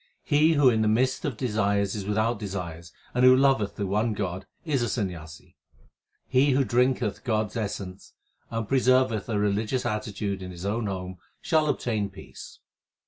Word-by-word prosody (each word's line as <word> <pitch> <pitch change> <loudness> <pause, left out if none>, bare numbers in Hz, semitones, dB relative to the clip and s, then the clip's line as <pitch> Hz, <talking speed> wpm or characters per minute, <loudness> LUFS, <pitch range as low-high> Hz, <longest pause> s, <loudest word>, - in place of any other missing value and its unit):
He 155 +3 +4
who 145 -3 +4
in 110 -3 +4
the 110 - +2
midst 130 +4 +1
of 135 -7 -3
desires 100 -4 0
is 100 -2 -5
without 110 +2 0
desires, 85 -5 -6 0.2
and 125 - +1
who 130 0 +8
loveth 130 -7 +2
the 100 - -2
one 105 +4 0
God 95 -2 -4 0.2
is 145 -6 0
a 120 - 0
Sanyasi. 85 -9 -5 0.7
He 135 +2 +3
who 135 +1 +3
drinketh 125 -3 +1
God 110 -4 0
s - - -16
essence 100 -3 -5 0.4
and 115 -2 -3
preserveth 130 -4 +2
a 110 - 0
religious 105 +5 0
attitude 105 -3 -3
in 90 - -6
his 90 +1 -8
own 110 +2 -1
home 95 -1 -5 0.2
shall 155 -2 +1
obtain 110 -7 -1
peace. 95 0 -12
110 Hz, 170 wpm, -26 LUFS, 100-125 Hz, 0.7 s, who